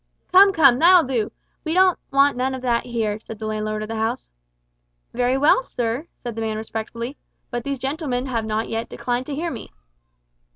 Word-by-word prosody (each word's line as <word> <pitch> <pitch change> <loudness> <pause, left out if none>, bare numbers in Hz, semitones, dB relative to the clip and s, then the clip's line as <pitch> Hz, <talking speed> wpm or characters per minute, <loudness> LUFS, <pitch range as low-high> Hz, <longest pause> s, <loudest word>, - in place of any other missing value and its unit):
'" - - -42
"Come, 390 +2 +8
come, 275 -8 +5
that'll 355 +1 +7
do. 245 -6 -1 0.3
We 320 +1 -2
don't 370 -1 +4
want 275 +1 +4
none 260 +1 -1
of 260 - -8
that 240 -2 +1
here," 220 -3 -2
said 225 0 -9
the 220 - -6
landlord 215 0 -2
of - - -6
the 225 0 -4
house. 220 - -2 0.8
"Very 250 +2 +1
well, 290 - +4
sir," 245 - -3
said 240 -1 -6
the 225 - -5
man 220 -1 -2
respectfully, 230 +4 -5 0.3
"but 240 -1 -3
these 280 +1 -3
gentlemen 265 -1 -2
have 235 -4 -2
not 220 +1 -1
yet 225 0 -3
declined 245 +1 -3
to 290 - -4
hear 335 +3 -2
me." - - -8
245 Hz, 200 wpm, -22 LUFS, 225-280 Hz, 0.8 s, Come